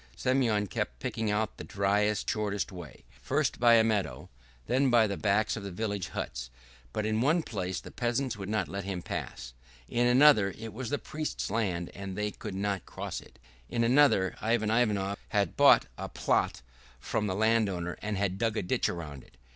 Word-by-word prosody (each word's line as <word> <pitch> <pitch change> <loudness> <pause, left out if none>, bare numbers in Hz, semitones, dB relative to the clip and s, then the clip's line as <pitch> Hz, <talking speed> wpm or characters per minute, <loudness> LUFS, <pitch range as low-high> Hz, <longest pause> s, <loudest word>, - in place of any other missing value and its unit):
Semyon 125 -6 +1
kept 95 - -3
picking 110 -1 -2
out 105 +1 -1
the - - -7
driest 105 +1 +1
and - - 0
shortest 105 -3 -2
way, 85 -7 -10 0.2
first 140 - 0
by 120 -1 +6
a 115 - +6
meadow, 100 - -1 0.4
then 135 - +2
by 120 -2 +5
the 100 -2 -2
backs 105 +2 +1
of 105 - -5
the 100 - -5
village 100 0 -3
huts; - - -5 0.4
but 105 - -2
in 110 +1 +1
one 160 +6 +3
place 95 - -3
the - - -11
peasants 120 +2 -1
would 100 -1 -6
not 105 -3 0
let 100 0 -5
them 95 -2 -4
pass, 60 -1 -5 0.3
in 120 +1 +1
another 125 -7 +6
it 110 -2 -7
was 120 +1 -5
the 145 - 0
priest's 155 -9 -4
land 95 -6 -1
and 95 -1 -6
they 105 0 -1
could 95 - -7
not 100 -1 -2
cross - - -5
it, - - -18 0.3
in 115 - 0
another 120 -7 +4
Ivan 110 -1 +1
Ionov 105 -4 +1
had 100 -5 0
bought - - +6
a - - -4
plot - - 0 0.4
from 105 - -1
the 95 - -1
landowner 100 -5 +1
and 105 -1 -2
had 95 -1 -1
dug 115 -1 0
a - - 0
ditch 90 - +1
round 75 -6 -6
it. - - -22
105 Hz, 195 wpm, -29 LUFS, 95-115 Hz, 0.4 s, by